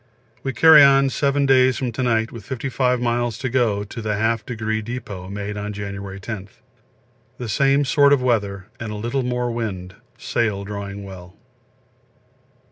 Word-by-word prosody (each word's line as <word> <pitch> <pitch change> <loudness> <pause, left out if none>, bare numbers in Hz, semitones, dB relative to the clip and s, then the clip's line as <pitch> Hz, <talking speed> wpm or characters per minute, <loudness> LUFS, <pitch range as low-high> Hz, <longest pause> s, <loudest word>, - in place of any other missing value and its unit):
We 135 - -2
carry 160 +2 +8
on 135 -1 +5
7 140 0 +1
days 130 -1 +4
from 125 -3 -2
to 115 - -4
night 115 -2 +1
with 115 -3 -9
55 125 +1 -1
miles 120 -1 -1
to 130 - -3
go 115 -5 +1
to 115 +3 -8
the 110 -1 -1
Half 110 +1 0
Degree 110 -2 -2
Depot 105 -5 -7
made 100 +1 -5
on 105 0 -4
January 100 -1 -6
10. 100 -1 -6 0.9
The 125 - -5
same 140 +6 +2
sort 140 +1 +4
of 145 - +5
weather 100 -6 -1
and 110 -3 -5
a - - -5
little 120 +6 -2
more 125 -1 -1
wind, 95 -6 -4 0.2
sail 105 -4 -1
drawing 100 0 -6
well. 95 -1 -11
115 Hz, 165 wpm, -21 LUFS, 100-130 Hz, 0.9 s, carry